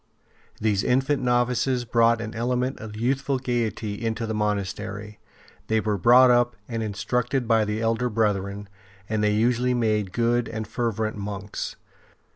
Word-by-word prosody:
These 105 Hz, -2 st, +1 dB
infant 135 Hz, +3 st, +1 dB
novices 125 Hz, 0 st, +1 dB
brought 115 Hz, 0 st, +3 dB
an 110 Hz, -1 st, -5 dB
element 125 Hz, +3 st, -1 dB
of 110 Hz, -1 st, -8 dB
youthful 135 Hz, +4 st, 0 dB
gaiety 115 Hz, -4 st, -2 dB
into 115 Hz, 0 st, -1 dB
the 110 Hz, -, -3 dB
monastery, 105 Hz, 0 st, -3 dB, 0.5 s
they 110 Hz, 0 st, +2 dB
were 105 Hz, -1 st, 0 dB
brought 125 Hz, +6 st, +7 dB
up 120 Hz, 0 st, +3 dB
and 115 Hz, -2 st, -3 dB
in 110 Hz, -2 st, -3 dB
structed 125 Hz, +5 st, -1 dB
by 110 Hz, -1 st, +3 dB
the 105 Hz, +1 st, -2 dB
elder 115 Hz, +2 st, +1 dB
brethren, 105 Hz, -2 st, -1 dB, 0.4 s
and 110 Hz, -1 st, -1 dB
they 105 Hz, 0 st, +2 dB
usually 125 Hz, +3 st, +2 dB
made 105 Hz, -5 st, 0 dB
good 120 Hz, +1 st, +1 dB
and 110 Hz, -2 st, -5 dB
fervent 110 Hz, -1 st, -2 dB
monks. 100 Hz, 0 st, -5 dB
115 Hz, 150 wpm, -25 LUFS, 105-120 Hz, 0.5 s, brought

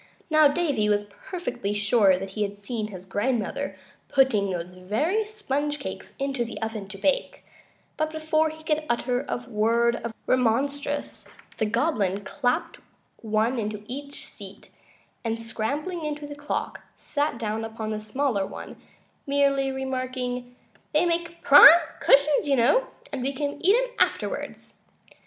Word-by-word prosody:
Now, 310 Hz, -1 st, +7 dB
Davy 285 Hz, -8 st, +1 dB
was 205 Hz, 0 st, 0 dB, 0.2 s
perfectly 245 Hz, -, -3 dB
sure 205 Hz, -2 st, +4 dB
that 190 Hz, +1 st, -6 dB
he 210 Hz, -, -4 dB
had 205 Hz, 0 st, -2 dB
seen 215 Hz, +1 st, -4 dB
his 190 Hz, -3 st, -10 dB
grandmother 205 Hz, -1 st, -2 dB, 0.3 s
putting 225 Hz, -7 st, +3 dB
those 175 Hz, -1 st, -4 dB
very 290 Hz, -, -1 dB
sponge 295 Hz, -9 st, -2 dB
cakes 275 Hz, -, -7 dB
into 275 Hz, -3 st, -1 dB
the 235 Hz, -, -7 dB
oven 220 Hz, -3 st, -4 dB
to 195 Hz, 0 st, -9 dB
bake, 280 Hz, +8 st, -1 dB, 0.5 s
but 310 Hz, 0 st, 0 dB
before 315 Hz, 0 st, +1 dB
he 315 Hz, 0 st, -11 dB
could 310 Hz, 0 st, 0 dB
utter 245 Hz, +1 st, 0 dB
a 245 Hz, 0 st, -3 dB
word 235 Hz, +1 st, +2 dB
of 235 Hz, -, -5 dB
remonstrance 280 Hz, +4 st, 0 dB, 0.3 s
the 220 Hz, -, +2 dB
Goblin 210 Hz, -, 0 dB
clapped 245 Hz, +4 st, -1 dB, 0.4 s
one 220 Hz, +3 st, 0 dB
into 210 Hz, -1 st, -4 dB
each 280 Hz, +4 st, -7 dB
seat, -, -, -11 dB, 0.5 s
and 225 Hz, -1 st, -2 dB
scrambling 290 Hz, +10 st, -3 dB
into 300 Hz, -1 st, -4 dB
the 290 Hz, -, -7 dB
clock 290 Hz, 0 st, -4 dB
sat 290 Hz, -4 st, -2 dB
down 220 Hz, 0 st, -2 dB
upon 220 Hz, -1 st, -5 dB
the 215 Hz, -, -2 dB
smaller 215 Hz, -1 st, 0 dB
one, -, -, -9 dB, 0.5 s
merely 275 Hz, -1 st, +2 dB
remarking: 255 Hz, -2 st, -3 dB, 0.4 s
"They 305 Hz, +3 st, +4 dB
make 340 Hz, 0 st, -2 dB
prime 285 Hz, +1 st, +11 dB, 0.3 s
cushions, 285 Hz, +1 st, +4 dB
you 280 Hz, -, +3 dB
know, 285 Hz, -, +3 dB, 0.3 s
and 275 Hz, -, -3 dB
we 270 Hz, +2 st, -1 dB
can 285 Hz, +3 st, -4 dB
eat 390 Hz, +5 st, +6 dB
'em -, -, -1 dB
afterwards." -, -, -1 dB
255 Hz, 145 wpm, -26 LUFS, 215-290 Hz, 0.5 s, prime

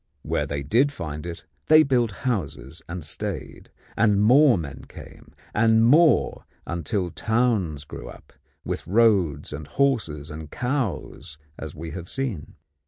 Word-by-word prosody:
Where -, -, -1 dB
they 70 Hz, -1 st, -3 dB
did 120 Hz, -, +3 dB
find 75 Hz, -, -6 dB
it 85 Hz, -1 st, -7 dB, 0.2 s
they 155 Hz, 0 st, +7 dB
built 125 Hz, -5 st, +2 dB, 0.2 s
houses 80 Hz, -, -3 dB
and 85 Hz, -1 st, -5 dB
stayed, 75 Hz, -, -6 dB, 0.3 s
and 105 Hz, -3 st, +3 dB
more 125 Hz, +3 st, +6 dB
men 70 Hz, -5 st, -7 dB
came, -, -, -13 dB, 0.2 s
and 115 Hz, -1 st, +4 dB
more, 155 Hz, +6 st, +4 dB, 0.2 s
until 85 Hz, +2 st, -2 dB
towns 110 Hz, -, 0 dB
grew -, -, -9 dB
up, -, -, -14 dB, 0.3 s
with -, -, -4 dB
roads 95 Hz, -10 st, +2 dB
and 75 Hz, 0 st, -7 dB
horses 100 Hz, -, 0 dB
and 75 Hz, 0 st, -8 dB
cows 120 Hz, -, -3 dB, 0.2 s
as -, -, -7 dB
we 80 Hz, +1 st, -7 dB
had 90 Hz, -1 st, -7 dB
seen. 120 Hz, -, -4 dB
95 Hz, 140 wpm, -24 LUFS, 75-120 Hz, 0.3 s, they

